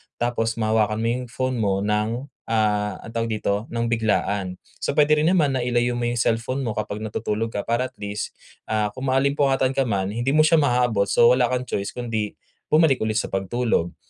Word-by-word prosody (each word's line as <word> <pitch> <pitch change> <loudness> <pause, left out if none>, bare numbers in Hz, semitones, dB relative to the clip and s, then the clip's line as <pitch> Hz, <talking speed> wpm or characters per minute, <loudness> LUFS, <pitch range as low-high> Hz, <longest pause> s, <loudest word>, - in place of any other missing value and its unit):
tapos 120 -2 -1
mahawakan 110 -1 +1
mo 115 - +1
yung 125 +1 -1
phone 130 0 -1
mo 100 -4 +1
ng, 105 +5 -1 0.2
ah, 105 -3 +1
anong 115 - -10
tawag 115 0 -1
dito 105 -2 0 0.2
nang 115 0 -1
biglaan. 105 -4 0 0.2
So, - - +1
puwede 150 +1 +4
rin 155 +3 +2
naman 150 -7 +2
na 125 - 0
ilayo 120 0 +1
mo 120 - -2
yung 120 0 -1
cellphone 115 +3 0
mo 115 -5 -2
kapag 105 0 -3
natutulog 110 +1 -3
ka 100 - -1
para 120 +2 0
at 130 - -22
least, 105 0 -5 0.3
ah, 105 -1 0
kung 130 +5 -6
maalimpungatan 135 0 +2
ka 135 -2 0
man 100 -2 -1
hindi 120 +6 0
mo 155 - +6
siya 160 +1 +4
maabot 120 -7 +2
so 120 +4 +5
wala 125 -1 +3
kang 125 0 -1
choice 100 -5 -4
kundi 115 -4 -3 0.3
bumalik 155 -4 +4
ulit 110 0 -1
sa 110 - -1
pagtulog. 95 -2 -1
115 Hz, 200 wpm, -23 LUFS, 105-130 Hz, 0.3 s, mo